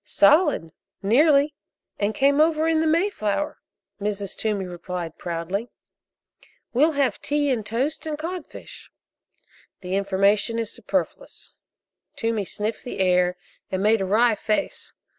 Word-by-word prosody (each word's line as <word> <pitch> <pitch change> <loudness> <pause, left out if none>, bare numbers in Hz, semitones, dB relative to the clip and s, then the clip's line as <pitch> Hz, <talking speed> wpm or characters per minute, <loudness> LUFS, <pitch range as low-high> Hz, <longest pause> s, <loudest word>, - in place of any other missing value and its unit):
"Solid, 285 - +3 0.3
nearly, 285 +7 +4 0.5
and 205 +1 0
came 280 +4 +4
over 315 0 +3
in 320 -1 +2
the 320 - +1
Mayflower," 310 - 0 0.4
Mrs. 200 -1 -3
Toomey 210 -3 -1
replied 175 -2 -6
proudly. 180 +6 -3 1.0
"We'll 300 +6 +4
have 280 -2 0
tea 290 -1 +1
and 235 -4 -1
toast 265 +10 -2
and 305 -1 -3
codfish." 335 +1 -8 0.9
"The 180 0 -5
information 200 +3 +2
is 230 -2 -2
superfluous." - - -4 0.6
Toomey 225 -3 -1
sniffed 210 +4 -3
the 245 - -6
air 180 -1 +2 0.3
and 190 +1 -1
made 215 0 +3
a - - 0
wry 225 +5 +4
face. 215 +5 -2
225 Hz, 125 wpm, -24 LUFS, 195-295 Hz, 1.0 s, nearly